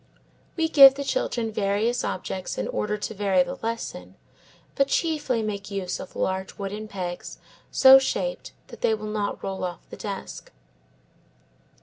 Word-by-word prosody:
We 325 -1 +2
give 275 -4 +9
the 280 - -4
children 240 - -1
various 210 +4 0
objects 185 0 -4
in - - -2
order 210 0 -2
to 210 - -5
vary 195 -3 +2
the - - -7
lesson, 230 0 -5 0.6
but 275 - +2
chiefly 290 -8 0
make 200 -2 -4
use 195 -3 -3
of - - -9
large 190 0 -2
wooden 205 +2 -5
pegs 180 -4 -6 0.3
so 265 0 +8
shaped - - -3 0.2
that - - -12
they 220 - +3
will 215 0 -8
not 210 -1 -3
roll 195 -1 -4
off 180 -1 -5
the - - -8
desk. 70 - -7
210 Hz, 150 wpm, -25 LUFS, 195-265 Hz, 0.6 s, give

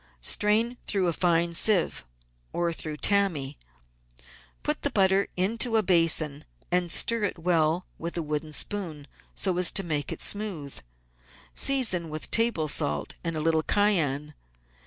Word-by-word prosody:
Strain 220 - +2
through 195 -3 0
a 170 - 0
fine 170 0 +1
sieve 185 0 +2 0.5
or 170 -1 -1
through 155 -2 -4
tammy, 165 -8 +1 1.1
put - - 0
the - - 0
butter 195 0 +2
into 225 +5 +1
a 220 - +2
basin, 165 -5 +3 0.3
and 175 -1 +1
stir 230 +6 +3
it 200 - -2
well 165 0 0
with 170 +1 -4
a 170 - -2
wooden 150 +1 -4
spoon 160 -4 -2 0.3
so 185 -3 +1
as 180 - +5
to 195 - 0
make 150 -4 -3
it - - -6
smooth. 190 -10 -1 0.7
Season 225 -12 +3
with 155 0 -3
table 225 -9 +1
salt 75 - 0
and 165 -2 -3
a - - -3
little 160 0 +1
cayenne. 150 -8 0
170 Hz, 145 wpm, -26 LUFS, 155-200 Hz, 1.1 s, as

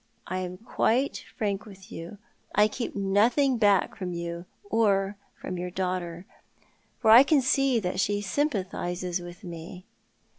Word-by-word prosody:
I 185 - -3
am 180 0 -5
quite 245 +4 0
frank 205 -1 -2
with 195 -2 -14
you. 170 +5 -8 0.4
I 210 0 +6
keep 235 +2 -5
nothing 225 +7 +2
back 205 -3 +3
from 185 -4 -4
you 170 0 -5 0.2
or 205 - +1 0.2
from 185 -1 -5
your 180 0 -3
daughter, 180 -1 -3 0.7
for 220 -2 +4
I 235 +3 +11
can 285 +1 +4
see 265 -1 +3
that 185 -2 -3
she 205 +1 +1
sympathises 185 - -2
with 175 +3 -10
me." 175 +1 -8
195 Hz, 145 wpm, -27 LUFS, 180-225 Hz, 0.7 s, I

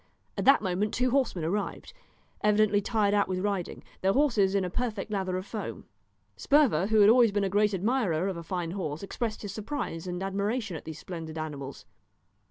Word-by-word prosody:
At - - -2
that 275 -4 +6
moment 195 +3 -1
two 255 0 +1
horsemen 250 - +1
arrived, 205 - -3 0.5
evidently 210 -1 +3
tired 205 -1 +1
out 205 -1 +3
with 185 - -2
riding, 195 -2 -2 0.2
their 190 +1 +3
horses 230 -9 +3
in 195 -2 +2
a - - -3
perfect 220 -2 -3
lather 190 -3 -1
of 185 - -5
foam. 215 -1 -6 0.5
Sperver, 270 - +3
who 220 -1 +4
had 205 - +7
always 235 -2 +5
been 205 0 0
a 195 - 0
great 210 +2 +3
admirer 195 -4 0
of 190 - -2
a 170 - -6
fine 170 0 -3
horse, 165 -4 -4
expressed 220 +2 -4
his 200 -2 -5
surprise 215 - -4
and 180 +1 -3
admiration 200 +1 -2
at - - -8
these 160 -1 -7
splendid 165 -3 -7
animals. 145 -4 -6
200 Hz, 190 wpm, -28 LUFS, 180-215 Hz, 0.5 s, had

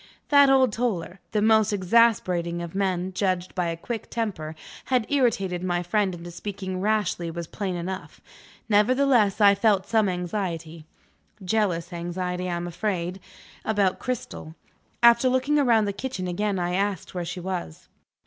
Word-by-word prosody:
That 285 -1 +6
old 260 -4 +4
Toller 195 -6 -2
the 210 -1 +1
most 220 -1 +4
exasperating 185 -4 +2
of 170 - -7
men, 190 -1 -1
judged 185 -2 -1
by 180 -2 -1
a 165 0 -3
quick 225 +6 -6
temper 180 -9 -3 0.3
had 250 -4 +1
irritated 195 -10 +1
my 175 -1 0
friend 190 +1 0
into 175 0 -9
speaking 190 0 -5
rashly 205 -5 0
was 170 +1 -5
plain 190 +2 -4
enough. 185 +2 -6 0.5
Nevertheless, 225 0 +3
I 200 -1 +7
felt 200 -1 +2
some 220 -3 +2
anxiety 170 -3 -4 0.6
(jealous 180 -4 0
anxiety, 180 +1 -3
I 175 - -1
am 170 0 -3
afraid) 180 0 -3 0.4
about 205 -4 +1
Cristel. 230 -10 -5 0.5
After 235 +2 +6
looking 260 +4 +1
round 235 -7 +3
the 200 - -2
kitchen 200 -4 -4
again, 200 +3 -1
I 175 0 -1
asked 195 -1 -2
where 180 -1 -3
she 180 +2 -5
was. 180 - -5
190 Hz, 150 wpm, -25 LUFS, 175-220 Hz, 0.6 s, I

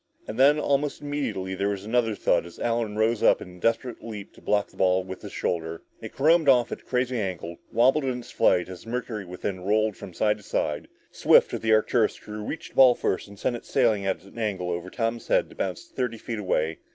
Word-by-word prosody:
And 110 - -6
then 145 +3 +6
almost 145 0 0
immediately 145 -10 -3
there 100 +2 0
was 100 -1 -4
another 115 -1 +1
thud - - +2
as 85 - -13
Allen 115 -3 -1
rose 110 0 +2
in 90 -1 +2
a - - -16
desperate 115 +4 -1
leap 105 -3 -8
to - - -17
block 105 -1 +1
the - - -20
ball 95 0 +3
with 95 0 -8
his - - -8
shoulder. 80 -1 -3 0.2
It - - -7
caromed 160 +2 +4
off 125 -3 +4
at - - -5
a - - -27
crazy 125 -1 -1
angle, 90 -4 -4
wobbling 135 +3 +3
in 125 - -4
its 120 - -13
flight 90 - +3
as 90 -1 -9
the 115 - -11
mercury 115 -4 -4
within 90 +2 -4
rolled 110 +2 +1
from 90 - -10
side 105 0 +2
to 105 - -16
side. 75 -5 -2 0.2
Swift, - - +4
of - - -3
the 110 - +1
Arcturus 110 +1 +3
crew, 105 0 -8
reached 150 +9 -6
the - - -25
ball 130 -2 +8
first 95 - -1
and 100 0 -13
sent 120 - -1
it - - -13
sailing 115 -6 +2
at 95 - -1
an 100 +4 -12
angle 95 -5 -2
over 85 +1 -4
Tom's 115 +2 -2
head - - +2
to - - -14
bounce 95 -3 -3
thirty 125 -3 -3
feet 115 0 -5
away. 80 -5 -1
110 Hz, 235 wpm, -26 LUFS, 95-120 Hz, 0.2 s, ball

